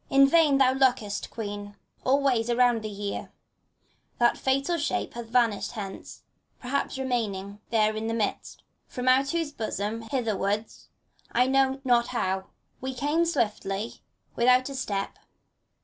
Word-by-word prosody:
In 275 0 +6
vain 300 -2 +5
thou 265 -1 +5
lookest, 250 -6 +1
Queen, 205 -2 -6 0.3
all 275 +2 +3
ways 240 -4 +2
around 240 -1 +3
thee 215 0 -5
here; 200 0 -5 0.9
That 240 0 +4
fatal 275 +6 0
shape 295 - -1
hath 235 -1 -7
vanished 230 -2 +1
hence, 200 -4 -8 0.4
perhaps 270 +2 -2
re 265 - -3
mained 205 -5 -2
There 215 -2 +2
in 220 +1 -3
the 225 - -1
mists, 215 -3 -2 0.3
from 250 0 -5
out 265 +2 +4
whose 330 -1 -1
bosom 220 -3 -3
hither 240 -6 0
wards 205 +3 -3 0.2
— - - -34
I 250 +1 +3
know 270 0 +2
not 240 -2 +3
how 190 -5 -2 0.2
— - - -42
^we 260 0 -4
came, 295 +5 +1
swiftly, 215 -8 -2 0.3
without 250 +2 +4
a - - -6
step. 200 -6 -3
240 Hz, 155 wpm, -27 LUFS, 210-265 Hz, 0.9 s, In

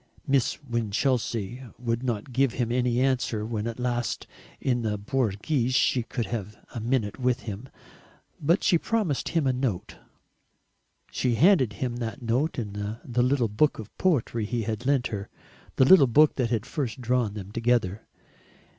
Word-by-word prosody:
Miss 135 -4 +2
Winchelsea 120 -1 -1 0.2
would 120 -1 -2
not 120 -1 -3
give 135 -1 +2
him 120 -2 -1
any 125 -1 +1
answer 125 -5 0
when 110 -1 -3
at 115 +1 -5
last, 120 -1 -1 0.3
in 125 -2 0
the 105 -2 -1
Borghese, 125 +3 0
she 130 - +3
could 120 0 -3
have 105 -1 -5 0.2
a 120 - -4
minute 115 -2 -1
with 125 0 +1
him; 110 +4 -7 0.7
but 170 +6 +2
she 175 -4 +4
promised 205 - -1
him 165 -4 +1
a 130 - +2
note. 125 -8 -2 1.1
She 125 -2 0
handed 135 - +4
him 120 +3 -3
that 115 +2 -4
note 130 +7 0
in 105 -5 -4
the 110 +4 -3
little 125 -1 +2
book 110 +9 +2
of 110 - -9
poetry 120 - +1
he 115 +1 -2
had 110 +3 -3
lent 135 -3 +2
her, 100 0 -4 0.5
the 130 - +5
little 145 -2 +8
book 150 +6 +5
that 125 -4 +1
had 115 -2 -1
first 130 -3 -3
drawn 120 -4 0
them 100 -1 -7
together. 115 -3 0
120 Hz, 165 wpm, -26 LUFS, 110-130 Hz, 1.1 s, little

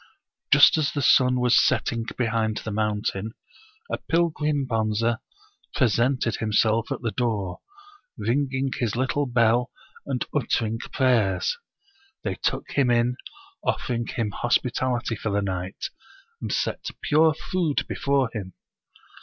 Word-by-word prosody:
Just 145 +2 +7
as 150 - +1
the 145 - -2
sun 125 -1 +5
was 125 -1 +5
setting 115 -2 0
behind 115 -3 0
the 110 - -5
mountain, 105 0 -2 0.6
a - - -1
pil 170 +1 +1
grim 150 -3 -1
Bonze 115 -1 +1 0.6
presented 125 -2 +2
himself 110 +1 +1
at - - -3
the 115 - 0
door, 105 -5 -2 0.6
ringing 135 +1 0
his 115 -3 -1
little 130 +3 0
bell 120 0 +2 0.4
and 130 -3 -1
uttering 115 -5 0
prayers. 125 - +1 0.7
They - - -1
took - - -2
him 140 -3 +2
in, 120 +1 +2 0.5
offering 120 -1 -1
him 110 -3 -2
hospitality 120 0 0
for 110 - -4
the 100 0 0
night, 95 0 -4 0.5
and - - -3
set - - -2
pure 155 +1 +4
food 170 -4 -1
before 140 -4 0
him. 95 -5 -6
120 Hz, 130 wpm, -25 LUFS, 110-135 Hz, 0.7 s, Just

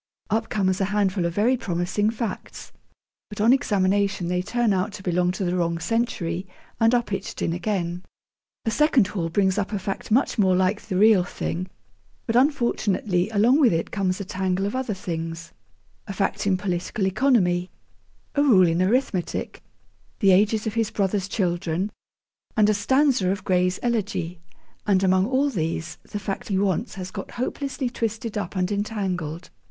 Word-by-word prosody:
Up 220 +1 0
comes 190 -2 0
a - - +3
handful 195 -3 +1
of 170 - -5
very 230 +5 +3
promising 190 -1 -1
facts, 230 0 -5 0.6
but 210 - -9
on 225 +4 +5
examination 200 -7 +1
they 180 0 0
turn 230 +2 +1
out 190 +3 0
to 200 - -9
belong 180 -1 +1
to 190 0 -3
the 175 0 0
wrong 170 -1 0
century, 185 -3 -2 0.3
and 225 +1 +4
are 240 - +2
pitched 195 -2 -5
in 165 - 0
again. 175 -1 -2 0.6
A 225 - +1
second 295 -4 +4
haul 180 -4 -3
brings 190 +2 +2
up 200 - -2
a 210 - -1
fact 195 0 -5
much 235 +1 +2
more 190 -2 +4
like 190 +3 +1
the 190 -4 -3
real 210 -2 +6
thing, 180 0 -4 0.6
but, 230 - -1
unfortunately, 220 - +1
along 225 +6 +4
with 270 -6 +5
it 165 -1 -1
comes 185 -2 -1
a 200 - -4
tangle 185 +1 -1
of 205 - -2
other 255 -5 -2
things 165 -2 -5 0.5
a 195 - -4
fact 200 0 -1
in 190 -2 +3
political 180 +2 -2
economy, 190 -5 +2 0.6
a 285 - +2
rule 220 -11 +6
in 165 +2 +1
arithmetic, 195 -2 -1 0.6
the 195 -4 +4
ages 210 +3 +3
of 220 - -2
his 225 -2 0
brother's 200 -2 -1
children, 180 -1 -1 0.7
and 210 -1 +5
a - - +2
stanza 255 -1 +2
of 195 0 -2
Gray's 180 -1 +1
'Elegy,' 200 -7 -1 0.5
and 195 -2 +3
among 185 +1 +3
all 270 +3 +1
these, 165 -4 -3
the - - -7
fact 195 -1 -4
he 195 - 0
wants 200 +3 0
has 185 -1 -6
got - - -6
hopelessly 265 +1 -3
twisted 225 -2 -3
up 200 -3 -4
and 185 +1 0
entangled. 190 -6 -3
195 Hz, 170 wpm, -24 LUFS, 180-220 Hz, 0.7 s, real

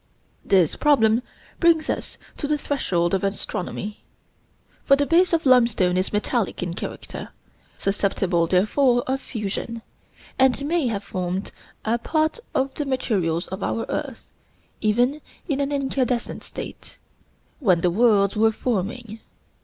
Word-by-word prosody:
This 185 -5 +3
problem 235 -6 +4 0.4
brings 330 -2 +4
us - - -3 0.2
to 290 - -3
the 300 0 +1
threshold 180 -13 0
of 195 - +1
astronomy; 200 +1 -3 0.8
for 275 - +5
the 285 +1 +1
base 345 +4 +4
of 330 -2 +1
limestone 235 -8 +4
is 185 +1 0
metallic 210 -1 -1
in 175 -1 -3
character, - - -6 0.5
susceptible 195 -3 0
therefore 240 - +3
of 265 +1 -1
fusion, 225 +1 -5 0.6
and 265 +1 +3
may 320 -2 +1
have 210 -3 -2
formed 185 0 -3 0.3
a 230 +2 +1
part 315 - 0 0.2
of 265 0 +1
the 295 - -3
materials 190 -11 0
of 190 +2 -6
our 225 - -1
earth, - - -4 0.5
even 245 +7 +2 0.3
in 285 -5 -1
an 280 0 0
incandescent 265 -3 -1
state, - - -9 0.6
when 185 - +3
the 180 - +2
worlds 200 -1 +3
were 220 +1 +4
forming. 220 0 -3
230 Hz, 135 wpm, -23 LUFS, 195-275 Hz, 0.8 s, for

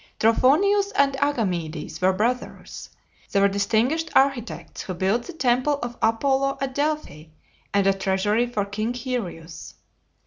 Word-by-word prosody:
Trophonius 390 - +3
and 275 -3 +3
Agamedes 180 - -2
were 185 +1 +4
brothers. 235 +7 -3 0.4
They 200 - +2
were 200 - +5
distinguished 225 +11 0
architects, 265 -7 0
and 185 - -4
built 200 +7 0
the 355 - -8
temple 255 0 +1
of 240 0 -5
Apollo 270 +4 +1
at 270 -1 -3
Delphi, 290 - -2 0.5
and 200 -1 +2
a 195 - +4
treasury 195 +4 0
for 215 -4 -2
King 215 +4 -3
Hyrieus. 180 -11 -6
235 Hz, 135 wpm, -24 LUFS, 195-275 Hz, 0.5 s, were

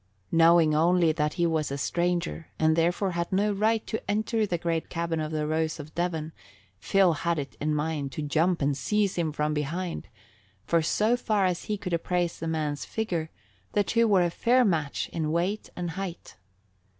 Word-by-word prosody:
Knowing 165 -1 +5
only 170 +1 +4
that 150 -1 -1
he 175 - +1
was 160 -4 0
a 140 - -2
stranger 175 +2 -1
and 160 0 +3
therefore 175 +4 +1
had 170 0 -3
no 205 +2 +2
right 220 +2 +1
to 220 - -3
enter 215 +1 +1
the 175 - -1
great 165 -1 -2
cabin 165 -1 -2
of 155 0 -3
the 155 -1 -1
Rose 160 +1 -1
of 150 +1 -9
Devon, 165 -3 -2 0.5
Phil 190 - +3
had 170 +2 -1
it 145 -1 -5
in 150 +1 0
mind 150 -2 -2
to 150 - -4
jump 160 +3 +1
and 140 0 +1
seize 200 +8 0
him 165 -3 0
from 150 0 -1
behind, 165 +4 -3 0.6
for 170 +5 +2
so 215 +8 +2
far 215 -5 +1
as 180 -2 -1
he 210 - -2
could 180 -3 -5
appraise 175 0 -1
the 165 - -4
man's 150 -3 -2
figure, 175 -8 -3 0.4
the 205 - +3
two 230 +3 +2
were 195 -4 +4
a 175 - 0
fair 245 +6 +3
match 155 -7 0
in 155 -2 -2
weight 180 +6 -1
and 175 -2 -3
height. 185 -1 -6
170 Hz, 190 wpm, -27 LUFS, 155-185 Hz, 0.6 s, Knowing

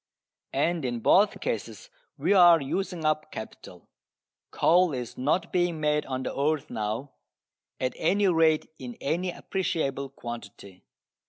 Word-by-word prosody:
And 165 +3 +1
in 120 -2 -2
both 200 - +4
cases - - -5 0.3
we - - +2
are 175 -3 +7
using 170 +3 -3
up 155 0 0
capital. 110 - -10 0.6
Coal 180 -1 +3
is 125 -2 -6
not 150 +7 -1
being 175 -3 +1
made 150 0 0
on 130 -1 -3
the - - -4
earth 150 +1 0
now, 110 +4 -3 0.7
at 130 0 -1
any 200 +5 +2
rate 160 -3 +3
in 125 -2 -8
any 175 +6 -1
appreciable 160 -7 -2
quantity. 100 -7 -9
155 Hz, 135 wpm, -27 LUFS, 130-175 Hz, 0.7 s, are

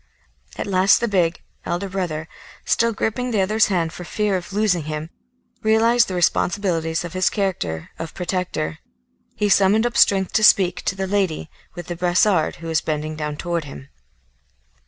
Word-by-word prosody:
At - - -3
last 190 0 +4
the 235 - 0
big, 175 -5 0 0.2
elder 175 +3 -3
brother, 175 -5 -3 0.4
still 230 0 +2
gripping 230 +3 -2
the 215 -5 +1
other's 215 +3 +3
hand 170 -4 -1
for 180 - -8
fear 205 +2 -1
of 180 +1 -5
losing 195 -6 +1
him, 155 +1 -5 0.5
realised 225 +2 +3
the 185 - -4
responsibilities 170 -2 0
of 170 - -8
his 185 0 +2
character 175 - -3
of 165 - -6
protector; 180 - -3 0.6
he 210 - 0
summoned 200 +3 +4
up 240 -1 -2
strength 190 -2 +3
to 220 - +2
speak 185 -4 +5
to 190 - 0
the 190 0 -2
lady 190 -5 -1 0.2
with 175 -1 -7
the 175 - -5
brassard, 180 0 +2
who 165 - -9
was 160 -1 +1
bending 155 0 -3
down 150 -1 -4
to 175 +2 -4
him. 140 -3 -8
185 Hz, 170 wpm, -21 LUFS, 165-205 Hz, 0.6 s, speak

